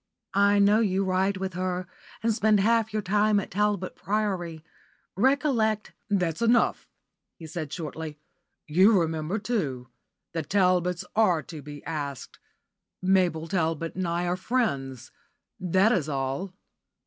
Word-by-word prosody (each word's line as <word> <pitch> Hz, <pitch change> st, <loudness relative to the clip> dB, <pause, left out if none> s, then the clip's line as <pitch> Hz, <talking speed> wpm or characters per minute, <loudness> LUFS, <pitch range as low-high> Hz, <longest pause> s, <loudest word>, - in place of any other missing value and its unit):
I 200 Hz, +1 st, +4 dB
know 205 Hz, +2 st, +5 dB
you 195 Hz, -3 st, +1 dB
ride 190 Hz, +1 st, +1 dB
with 190 Hz, -1 st, -4 dB
her, 180 Hz, 0 st, -2 dB, 0.4 s
and 225 Hz, 0 st, +2 dB
spend 215 Hz, -1 st, +3 dB
half 220 Hz, +1 st, +2 dB
your 215 Hz, 0 st, -2 dB
time 210 Hz, +2 st, +3 dB
at 200 Hz, -, -6 dB
Talbot 205 Hz, -1 st, 0 dB
Priory. 190 Hz, -6 st, -2 dB, 0.5 s
Recollect 235 Hz, -3 st, +1 dB
" -, -, -49 dB
"That's 180 Hz, -4 st, 0 dB
enough," 235 Hz, 0 st, +2 dB, 0.5 s
he 165 Hz, -, -10 dB
said, 155 Hz, -2 st, -5 dB
shortly. 160 Hz, -2 st, -6 dB, 0.5 s
"You 190 Hz, +6 st, +5 dB
remember, 160 Hz, +3 st, -1 dB
too. 155 Hz, -, -2 dB, 0.4 s
The 165 Hz, -, -1 dB
Talbots 180 Hz, 0 st, +1 dB
are 185 Hz, -8 st, +3 dB
to 155 Hz, +2 st, -9 dB
be 145 Hz, 0 st, -10 dB
asked. 145 Hz, -4 st, -5 dB, 0.6 s
Mabel 180 Hz, -4 st, +2 dB
Talbot 165 Hz, -2 st, -1 dB
and 185 Hz, -1 st, -2 dB
I 170 Hz, +1 st, -1 dB
are 175 Hz, 0 st, 0 dB
friends. 135 Hz, -, -2 dB, 0.5 s
That 190 Hz, +4 st, +3 dB
is 160 Hz, -10 st, 0 dB
all." 135 Hz, +6 st, -2 dB
185 Hz, 135 wpm, -27 LUFS, 160-210 Hz, 0.6 s, know